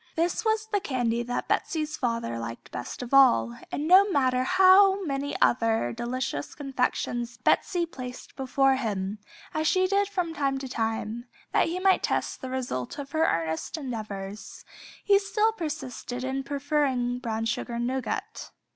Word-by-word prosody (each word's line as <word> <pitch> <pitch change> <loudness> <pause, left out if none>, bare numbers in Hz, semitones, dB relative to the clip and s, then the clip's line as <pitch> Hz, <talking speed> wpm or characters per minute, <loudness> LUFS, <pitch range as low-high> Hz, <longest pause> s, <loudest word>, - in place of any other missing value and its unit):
This 340 +6 0
was 440 -1 +1
the 415 -2 0
candy 245 -7 -1
that 245 +1 -3
Betsey's 310 -2 -1
father 230 - -2
liked 115 0 -7
best 125 - -6
of 245 - -8
all, 120 - +5 0.2
and 295 - -2
no 385 +4 +7
matter 260 -6 +2
how 380 +3 +6
many 280 -1 -2
other 225 - +2
delicious 255 +4 -3
confections 250 -3 -2
Betsey 345 +7 +2
placed 255 -6 -9
before 270 0 +2
him, 205 -4 -3 0.3
as 310 0 0
she 370 +2 +3
did 400 +1 +2
from 360 -4 -2
time 275 -3 0
to 270 0 -5
time, 225 0 -3 0.2
that - - +3
he 350 +2 -2
might 380 0 +4
test - - -1
the 260 - -5
result 250 - -3
of 280 -1 -7
her 320 0 +2
earnest 160 - -1
endeavors, 215 -7 -6 0.4
he 400 -1 +5
still 420 +2 +1
persisted 290 - -5
in 265 +1 -2
preferring 275 -3 0
"Brown 225 -2 -2
Sugar 235 +1 -2
Nougat." 265 - -3
265 Hz, 155 wpm, -27 LUFS, 235-325 Hz, 0.4 s, no